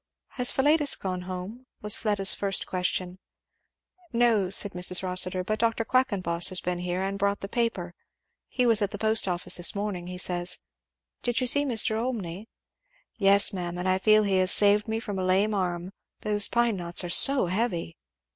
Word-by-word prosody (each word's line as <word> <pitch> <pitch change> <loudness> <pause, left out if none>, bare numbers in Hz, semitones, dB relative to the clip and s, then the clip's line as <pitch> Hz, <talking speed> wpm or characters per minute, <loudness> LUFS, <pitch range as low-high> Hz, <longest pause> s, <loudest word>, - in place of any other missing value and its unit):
"Has 250 -1 +2
Philetus 295 +1 +2
got 185 -2 -5
home?" 185 +7 -9 0.2
was 210 -1 +3
Fleda's 205 -3 +2
first 195 -1 0
question. 185 0 -3 0.9
"No," 230 -6 +1
said 200 +1 +3
Mrs. 180 +1 +2
Rossitur, 185 0 0
"but 215 +3 -4
Dr. 230 0 -1
Quackenboss 195 -10 +1
has 185 - -5
been 180 0 -4
here 180 +1 -4
and 195 +1 -4
brought 200 0 -1
the 195 - -5
paper 195 -6 -3 0.5
he 250 - -2
was 230 -3 +3
at 200 - 0
the 205 - -7
post 220 0 0
office 180 -1 +1
this 175 +3 +1
morning, 200 -4 -5
he 180 0 -8
says. 180 -1 -1 0.6
Did 240 0 0
you 255 - -1
see 285 +4 +3
Mr. 225 -4 +1
Olmney?" 210 -5 -6 0.7
"Yes 200 +1 +5
ma'am, 175 -2 -5
and 180 +1 -4
I 185 0 +1
feel 215 +2 +3
he 195 -2 0
has 185 0 +3
saved 205 +1 +3
me 220 0 -3
from 205 -4 -6
a - - -3
lame 195 +4 +1
arm 180 -1 -4 0.3
those 205 -1 -1
pine 235 -3 0
knots 175 0 -1
are - - -5
so 270 +6 +5
heavy." 180 - -3
195 Hz, 185 wpm, -25 LUFS, 180-220 Hz, 0.9 s, Yes